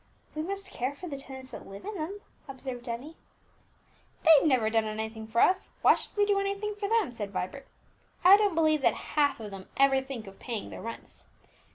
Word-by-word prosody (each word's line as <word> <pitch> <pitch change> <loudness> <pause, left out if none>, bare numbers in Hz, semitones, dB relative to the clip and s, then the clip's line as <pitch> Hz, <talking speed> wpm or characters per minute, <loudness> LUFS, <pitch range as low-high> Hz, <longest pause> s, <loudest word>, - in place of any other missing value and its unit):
"We 310 - -3
must 390 +3 -5
care 255 +4 -2
for 360 +5 -8
the 290 - -5
tenants 265 -1 -10
that - - -9
live 195 +1 -10
in 425 - -4
them," 385 +3 -5 0.3
observed 260 -2 -6
Emmie. 265 +8 -6 1.1
"They've 320 -2 +7
never 255 -6 +3
done 225 -1 +2
anything 220 +1 -4
for 230 +1 +1
us, 375 0 +3
why - - +8
should - - -7
we 410 - +5
do 405 -1 +2
anything 400 +1 -2
for 405 -1 -4
them?" 445 - +2
said 210 -4 -5
Vibert. 200 +8 -4 0.6
"I 370 +3 +10
don't 410 -4 +2
believe 310 -2 +3
that - - +3 0.2
half 285 -3 +3
of 215 -2 -7
them 195 -1 -9
ever 270 -1 +5
think 265 -4 -7
of 195 0 -12
paying 230 -4 -5
their - - -8
rents. 230 0 -8
275 Hz, 205 wpm, -29 LUFS, 230-370 Hz, 1.1 s, I